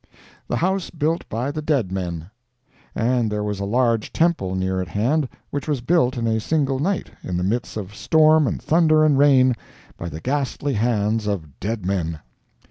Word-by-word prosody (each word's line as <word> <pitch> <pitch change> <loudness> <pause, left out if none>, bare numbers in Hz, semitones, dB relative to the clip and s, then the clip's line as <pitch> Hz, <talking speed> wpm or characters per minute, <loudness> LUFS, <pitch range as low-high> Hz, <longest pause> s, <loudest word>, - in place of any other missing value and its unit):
THE - - -1
HOUSE 190 +1 0
BUILT 160 +1 -2
BY 120 +6 -2
THE 155 +1 -4
DEAD 140 - 0
MEN 90 -2 -4 0.6
And 120 -1 +1
there 105 0 -1
was 105 -1 -3
a 100 - -2
large 115 0 +1
temple 160 - +1
near 95 0 -1
at 90 - -4
hand 125 - 0 0.2
which 145 +1 -4
was 145 -5 -1
built 130 -2 +2
in 115 - -1
a 110 -1 +1
single 135 +1 0
night, 185 +6 -1
in 90 - -3
the 90 - -1
midst 110 +4 -2
of 100 -1 -6
storm 155 +4 +4
and - - -2
thunder 155 -1 +3
and 150 -2 +4
rain, 135 -2 +5 0.4
by 85 - -5
the 80 - -7
ghastly 140 - -1
hands 110 -1 0
of 80 -9 -4
dead 105 -1 -3
men! 85 -5 -1
120 Hz, 185 wpm, -22 LUFS, 100-145 Hz, 0.6 s, rain